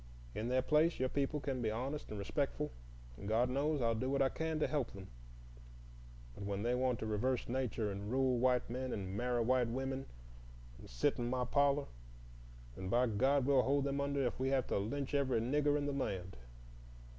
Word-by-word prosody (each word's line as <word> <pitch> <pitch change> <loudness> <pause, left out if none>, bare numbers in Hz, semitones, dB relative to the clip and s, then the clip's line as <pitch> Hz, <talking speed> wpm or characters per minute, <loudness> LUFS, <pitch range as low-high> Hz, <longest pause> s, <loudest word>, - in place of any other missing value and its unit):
In 110 - -3
their 130 +1 +2
place, 155 +4 +3
your 130 0 +1
people 140 +2 0
can 135 -3 -3
be 110 - +1
honest 130 +7 -3
and 105 - -5
respectful; 140 +8 -2 0.5
and 100 - -7
God 120 +4 +2
knows, 145 +1 +1
I'll 115 0 +3
do 125 +4 -1
what 140 - +1
I 135 - +3
can 160 +1 -2
to - - +2
help 140 -3 -1
them. 95 -1 -9 1.2
But 100 - -8
when 100 0 -2
they 120 +1 +1
want 125 -1 +1
to - - -2
reverse 120 +4 0
nature, 120 -4 -1
and 100 +1 -5
rule 130 0 +2
white 125 0 +3
men, 130 +2 -3
and 95 -1 -4
marry 120 +1 +1
white 125 0 +3
women, 135 +2 -3 0.7
and - - -12
sit - - +1
in 120 0 -1
my 125 0 0
parlor, 140 +2 +2 0.9
then, 95 0 -5
by 120 +4 +4
God! 130 +5 +2
we'll 135 -1 +5
hold 140 +2 +2
them 140 0 -1
under 140 -1 0
if 120 - -2
we 130 +1 +1
have 135 -2 +2
to - - +1
lynch 135 +8 -3
every 135 -4 +2
Nigger 145 +5 +2
in 145 - -1
the 145 - -1
land. 95 -9 -3
130 Hz, 205 wpm, -36 LUFS, 115-140 Hz, 1.2 s, we'll